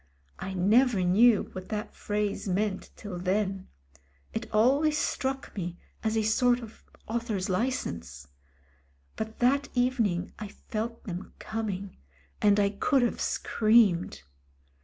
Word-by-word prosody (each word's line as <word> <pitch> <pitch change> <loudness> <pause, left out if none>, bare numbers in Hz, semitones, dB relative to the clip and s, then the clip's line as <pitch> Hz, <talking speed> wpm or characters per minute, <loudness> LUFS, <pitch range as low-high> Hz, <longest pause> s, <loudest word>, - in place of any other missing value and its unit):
I 190 0 -5
never 210 +3 +4
knew 210 +5 +5
what 185 0 -8
that 210 -1 -4
phrase 205 -1 -2
meant 195 +1 -1
till 195 -5 -7
then; 190 +1 -1 0.7
it - - -4
always 280 +8 +3
struck 270 -1 -2
me 175 -3 -4 0.3
as 220 0 +1
a 220 - +2
sort 245 +3 +3
of 225 -1 -12 0.2
author's 220 -4 -2
license. 85 - -2 0.9
But 220 0 -5
that 275 +3 +2
evening 230 -8 +1
I 215 - -5
felt 225 +3 -5
them 180 -1 -6
coming, 200 -3 -4 0.4
and 205 0 +5
I 200 -1 +3
could 255 +6 +2
have 240 - -1
screamed. 210 - +2
215 Hz, 125 wpm, -28 LUFS, 190-235 Hz, 0.9 s, knew